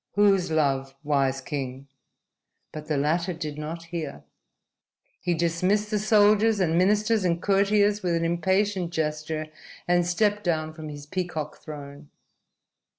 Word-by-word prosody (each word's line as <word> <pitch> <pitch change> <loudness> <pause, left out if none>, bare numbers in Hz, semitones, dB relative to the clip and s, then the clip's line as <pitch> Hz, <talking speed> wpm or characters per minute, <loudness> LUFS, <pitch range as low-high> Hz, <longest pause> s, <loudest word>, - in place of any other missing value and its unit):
"Whose 195 -3 +3
love, 135 -4 0
wise 135 -2 +1
king?" 135 -1 -5 0.8
But 155 0 -8
the 155 -2 0
latter 165 +5 0
did 155 -3 -6
not 160 +2 -5
hear. 170 -4 -6 1.0
He 175 - 0
dismissed 185 +6 +1
the 210 - +1
soldiers 215 0 +4
and 165 -3 +1
ministers 210 +4 +3
and 170 -2 +1
courtiers 205 +2 +2
with 175 -3 0
an 165 0 0
impatient 190 +2 +1
gesture, 155 -1 -2 0.4
and 175 0 +3
stepped 205 +4 +1
down 155 -3 -1
from 155 -1 -8
his 145 -1 -8
peacock 160 -2 -4
throne. 145 -1 -9
170 Hz, 135 wpm, -26 LUFS, 150-195 Hz, 1.0 s, soldiers